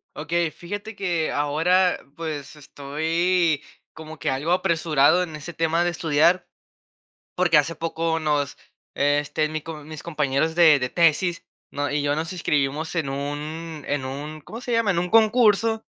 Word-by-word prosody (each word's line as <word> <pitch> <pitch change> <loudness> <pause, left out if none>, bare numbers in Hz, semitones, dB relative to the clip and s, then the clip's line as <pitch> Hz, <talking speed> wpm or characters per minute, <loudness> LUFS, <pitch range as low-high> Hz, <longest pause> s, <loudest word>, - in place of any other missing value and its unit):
Okey, 165 +2 -1
fíjate 205 +6 -7
que 175 -5 -1
ahora, 165 +6 +2 0.2
pues, 155 -3 -5
estoy 160 +3 0 0.3
como 160 0 -10
que 145 - -1
algo 140 +6 -2
apresurado 170 -3 +3
en 160 -4 -4
ese 150 +3 -8
tema 165 +1 +1
de 175 - +1
estudiar, 170 +2 +2 0.9
porque 175 -4 +4
hace 150 +3 0
poco 165 +1 -1
nos 150 -3 0 0.4
este, 145 +2 +1
mi 155 0 -3
co 155 -1 -8
mis 155 -1 -9
compañeros 150 -1 0
de 160 -4 +6
de 125 -1 -2
tesis, 170 +3 +2 0.3
¿no?, 145 0 -2
y 145 +1 0
yo, 145 0 0
nos 160 +2 -3
inscribimos 150 -2 -1
en 160 -5 -1
un 150 +3 -5
en 145 -2 -2
un 145 +4 -6
¿cómo 225 - -9
se 245 - -4
llama? 230 -3 +2
En 170 - -1
un 180 +1 -1
concurso 225 -1 +4
160 Hz, 160 wpm, -23 LUFS, 145-175 Hz, 0.9 s, de